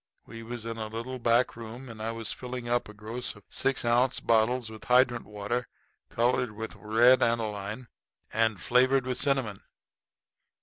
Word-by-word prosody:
We 115 0 -9
was 115 0 -6
in 115 0 -4
a 110 -1 -3
little 115 +4 -5
back 120 +1 +3
room, 120 +3 -8
and 115 -2 -9
I 110 +1 -2
was 115 -1 -3
filling 125 -1 -6
up 120 -2 0
a - - -10
gross 115 +4 -4
of 105 - -16
six 135 -2 0
ounce 120 +2 +3
bottles 115 +2 +2
with 110 -1 -10
hydrant 125 -2 +3
water 105 +4 -3 0.4
colored 125 +1 +1
red 110 +1 -6 0.5
with - - -12
aniline 110 0 -1 0.5
and 110 -2 +2
flavored 130 +2 +3
with 125 -1 -1
cinnamon. 130 -8 0
115 Hz, 165 wpm, -28 LUFS, 110-125 Hz, 0.5 s, back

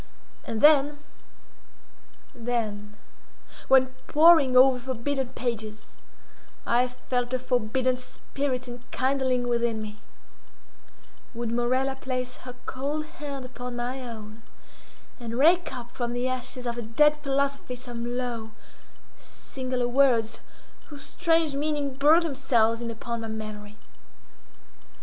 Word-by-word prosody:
And 225 -1 -3 1.7
then—then, 215 -3 -3 0.7
when, 265 -1 +6 0.2
poring 305 -5 +6
over 255 0 +7
forbidden 260 +1 -2
pages, 220 -3 -5 0.7
I 245 +2 +3
felt 250 0 -2
a - - +2
forbidden 255 0 0
spirit 255 0 -4
enkindling 255 +1 -1
within 235 -2 0
me—would 215 +2 -11
Morella 255 +3 +1
place 255 -2 -3
her 250 -1 -10
cold 290 +4 -3
hand 285 -4 -7
upon 250 -1 -7
my 245 +2 -3
own, 220 -2 -9 0.8
and 235 -1 -5
rake 330 +4 +4
up 240 -2 -7
from 240 -1 -3
the 245 +1 -1
ashes 255 0 -4
of 240 0 -2
a - - -2
dead 295 +7 +3
philosophy 275 -2 -1
some 240 -1 -5
low, 235 -3 -4 0.7
singular 255 -2 -4
words, 245 -3 +3 0.5
whose 290 -2 -6
strange 330 -3 +2
meaning 290 -1 -1
burned 300 +5 +5
themselves 240 -7 +1
in 235 - -3
upon 230 +1 -4
my 225 - -5
memory. 215 -1 -7
250 Hz, 110 wpm, -27 LUFS, 235-270 Hz, 1.7 s, over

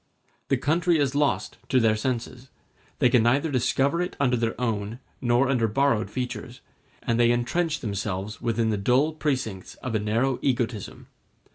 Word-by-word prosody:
The - - +2
country 170 +3 +2
is 140 -3 +1
lost 145 0 0
to 130 - +4
their 110 -2 +3
senses, 125 +2 -4 0.5
they - - +4
can 125 -1 +4
neither 140 +7 +2
discover 140 +5 +1
it 180 - -3
under 125 -4 +2
its - - -8
own 110 -2 -2 0.2
nor 120 +1 +3
under 125 -4 +2
borrowed 115 0 +1
features, 125 -1 -5 0.4
and 115 0 0
they 120 0 +5
entrench 150 +7 0
themselves 100 -1 -4
within 115 -1 0
the 105 - 0
dull 130 +10 +2
precincts 130 -11 -3
of 130 - -6
a 110 - +2
narrow 115 +5 0
egotism. 120 -5 -2
125 Hz, 160 wpm, -25 LUFS, 115-135 Hz, 0.5 s, they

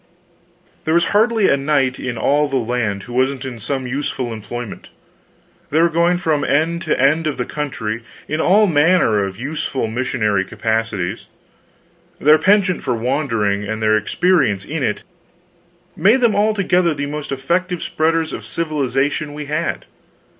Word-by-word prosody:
There 160 - +1
was 170 0 +4
hardly 220 0 +3
a - - +4
knight 135 -2 0
in 125 -2 -4
all 145 +6 +2
the 135 - -3
land 115 -5 -1
who 120 - -10
wasn't 130 +1 0
in 125 -3 -6
some 130 +4 -3
useful 130 -2 -3
employment. 110 +1 -7 0.8
They 155 - +1
were 170 +1 +4
going 170 +2 +2
from 160 -4 0
end 165 +4 +1
to 155 - 0
end 155 +5 +3
of 150 - -2
the 125 - -2
country 115 -7 -4 0.3
in 155 +1 -1
all 210 +4 +5
manner 150 - +3
of 95 -1 -5
useful 135 0 -3
missionary 110 -4 0
capacities; 110 -3 -2 0.9
their 155 +2 +5
penchant 190 +1 +3
for 125 - -1
wandering, 115 -5 0
and 110 +1 -3
their 110 0 +3
experience 110 - +1
in 160 +1 -4
it, 105 -5 -1 0.9
made 225 +7 +4
them 235 -3 +4
altogether 190 -5 +2
the 145 0 -3
most 150 0 -5
effective 170 +6 -1
spreaders 160 0 0
of - - -6
civilization 145 -2 -1
we 150 0 -6
had. 150 +2 -2
140 Hz, 155 wpm, -19 LUFS, 120-165 Hz, 0.9 s, all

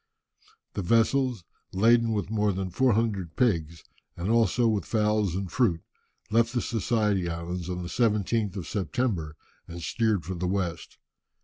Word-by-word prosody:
The - - -2
vessels, 115 +2 +2 0.3
laden 115 +4 +4
with 105 -2 -2
more 105 -1 +2
than 95 -1 -3
four 130 +5 +3
hundred 100 -7 -1
pigs, 85 -9 0 0.3
and 90 +5 -1
also 115 +1 +3
with 110 -3 +1
fowls, 105 -4 +1
and 95 -2 -3
fruit, 90 -8 +1 0.5
left 115 +1 +3
the 120 - +1
Society 105 -5 0
Islands 85 +1 -4
on 90 0 -3
the - - -5
17th 105 -1 0
of 90 - -4
September, 100 -7 -2 0.3
and 85 +1 -8
steered 110 -7 0
for 95 - -4
the 90 0 -3
west. 90 -3 -3
105 Hz, 150 wpm, -27 LUFS, 90-115 Hz, 0.5 s, laden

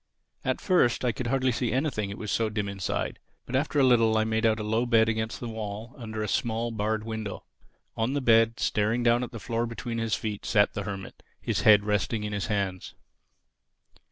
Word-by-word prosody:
At - - -1
first 150 -10 +2
I 125 - +3
could 120 +2 -4
hardly 130 +1 +2
see 120 0 -1
anything, 130 -6 -1
it 100 - -6
was 105 - -4
so 115 -1 +1
dim 105 -1 -2
inside. 100 -2 -3 0.3
But 130 - -4
after 145 +2 +1
a - - +5
little 115 -3 +4
I 110 - +3
made 110 +1 +1
out 110 0 +1
a - - -3
low 110 +3 0
bed 115 -2 +4
against 110 0 -2
the 120 - -5
wall, 110 +1 -6
under 110 -3 -5
a - - -2
small 115 +2 -1
barred 110 0 -1
window. 110 -3 -5 0.5
On 115 +4 0
the 145 - +1
bed, 115 -3 +4
staring 110 +3 +1
down 120 +1 +3
at 125 - -4
the 115 - -7
floor 115 +3 -2
between 115 0 -4
his 115 -1 0
feet, 105 -2 -4
sat 105 -3 +3
the 100 - -4
Hermit, 95 -2 -7 0.2
his - - -1
head 105 -1 +6
resting 105 +1 0
in 105 0 -3
his 100 - -2
hands. 100 -4 -2
110 Hz, 215 wpm, -27 LUFS, 105-120 Hz, 0.5 s, head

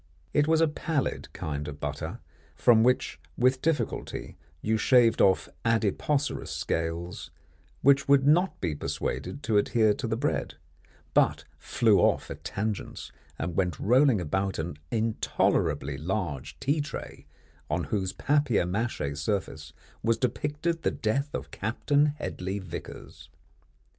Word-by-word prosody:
It 145 0 +3
was 160 0 +4
a 165 - +5
pallid 150 -1 -2
kind 75 -1 -4
of 75 0 -7
butter, - - -4 0.3
from 115 -3 +5
which 125 - +2 0.2
with 130 +1 +3
difficulty 160 -2 -2 0.2
you 110 +7 0
shaved 115 0 +4
off 95 -1 +4 0.2
adipocerous 115 +6 0
scales, 85 +2 -3 0.5
which 140 +1 +5
would 140 -1 +5
not 175 +6 +3
be 85 -4 -1
persuaded 140 - -4
to 110 -6 +2
adhere 110 +1 +3
to - - -4
the - - -1
bread, - - -1 0.6
but - - +3 0.2
flew - - +3
off - - +2
at - - -8
tangents 105 +1 -4 0.3
and 85 +1 -3
went 90 -5 0
rolling 125 0 +4
about 95 +3 -1
an 80 -2 -4
intolerably 80 -10 0
large 85 -4 -3
tea 145 +3 +1
tray 150 - -7 0.4
on - - 0
whose 95 -3 -1
papier 145 -9 +1
mâché 90 -7 -2
surface 80 +4 -3 0.3
was 115 0 +2
depicted 150 +7 -1
the - - +2
death 135 +7 -1
of - - -5
Captain 145 +7 +1
Hedley 100 -10 -4
Vicars. 85 -4 -9
110 Hz, 135 wpm, -28 LUFS, 90-140 Hz, 0.6 s, a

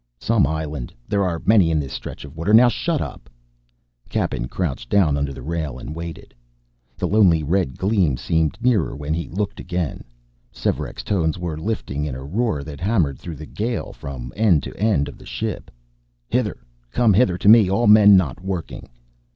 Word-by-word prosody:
"Some 70 - +2
island 75 -4 -4 0.2
there 100 -1 +1
are 85 -3 -2
many 100 -6 +5
in 80 -2 +2
this 70 -3 -5
stretch - - -7
of 70 +1 -12
water 90 +7 +3
now 120 +2 +7
shut 160 +4 -1
up!" - - -7 0.8
Cappen - - -1
crouched 65 -6 -3
down 90 -8 +3
under 70 0 -1
the 65 -2 -9
rail 80 -4 -3
and 75 - -7
waited. 85 -1 -8 0.6
The - - -1
lonely 95 -7 +4
red 80 -3 0
gleam 95 - +1
seemed 80 +5 0
nearer 115 - +2
when 75 +2 -3
he 85 +1 -3
looked 100 +3 -3
again. 90 -3 -3 0.5
Svearek's - - -3
tones 85 -5 0
were 85 -3 -4
lifting 80 -5 -3
in 75 -4 -3
a 65 - -7
roar 85 - -1
that 75 -1 -9
hammered 90 - +1
through 85 -2 -7
the 75 - -9
gale 115 +8 -3
from 65 -3 -8
end 100 -9 +3
to - - -7
end 105 -9 +1
of - - -10
the - - -14
ship: - - -4 0.6
"Hither! 120 -4 0 0.3
Come 110 - +3
hither 95 -3 +3
to 100 - -2
me, 110 -3 +8
all 115 +5 +1
men 105 -1 +8
not 85 -4 -1
working!" 95 -3 -5
85 Hz, 185 wpm, -22 LUFS, 75-100 Hz, 0.8 s, me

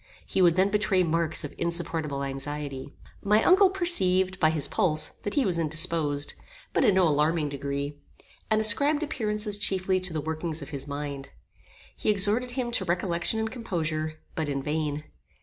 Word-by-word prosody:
He - - 0
would 170 -2 +5
then 190 +2 +2
betray 205 -3 +2
marks 165 -1 0
of 150 - -6
insupportable 165 -4 0
anxiety. 140 0 -5 0.3
My 210 +2 +3
uncle 380 +1 +6
perceived, 190 - +2
by 155 - +4
his 155 -3 -1
pulse, 155 -4 +1
that 205 - -4
he 280 - +2
was 175 -3 0
indisposed, 155 -2 0 0.4
but - - +2
in 200 - +4
no 185 -2 +4
alarming 150 +1 +1
degree, 140 +1 -4 0.5
and 220 -1 +3
ascribed 285 +8 +3
appearances 210 -6 -1
chiefly 190 -1 +1
to 185 0 -1
the 160 - -2
workings 160 0 -4
of - - -10
his 140 -1 -5
mind. 140 -1 -5 0.7
He - - -2
exhorted 210 +5 +2
him 245 -2 -1
to 205 -5 0
recollection 175 +3 0
and 220 0 -2
composure, 160 -9 -3 0.2
but 155 -2 -3
in 140 -1 -2
vain. 150 0 -2
170 Hz, 165 wpm, -27 LUFS, 150-205 Hz, 0.7 s, uncle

